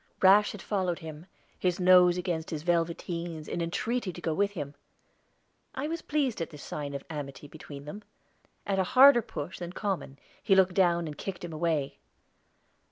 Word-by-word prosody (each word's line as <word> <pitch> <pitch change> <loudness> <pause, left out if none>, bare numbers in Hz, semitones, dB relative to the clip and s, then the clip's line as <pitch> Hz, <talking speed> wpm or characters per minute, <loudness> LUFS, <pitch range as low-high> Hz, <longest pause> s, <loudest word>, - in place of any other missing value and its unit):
Rash 200 +2 +6
had 210 - -9
followed 185 -4 -1
him, 160 0 -9 0.3
his 180 -1 0
nose 180 -1 +6
against 170 -3 -2
his 155 -2 -4
velveteens, 170 -1 -2
in 175 - -3
entreaty 215 +5 -2
to 175 - -10
go 165 -2 -1
with 200 +4 +1
him; 145 -6 -5 1.0
I 270 +3 -2
was 330 +1 -3
pleased 275 - -1
at 165 - -3
this 150 -2 -11
sign 145 -1 -5
of 140 - -5
amity 145 -2 -7
between 145 -2 -10
them. 205 +8 -8 0.6
At 195 -1 0
a - - +4
harder 265 -2 +9
push 160 -4 -7
than 175 0 -6
common 190 -10 -3 0.2
he 195 - +3
looked 190 -1 +4
down 175 -2 +3
and 150 -2 -7
kicked 190 -3 -5
him 170 -2 -6
away. 155 -3 -1
175 Hz, 175 wpm, -29 LUFS, 155-195 Hz, 1.0 s, harder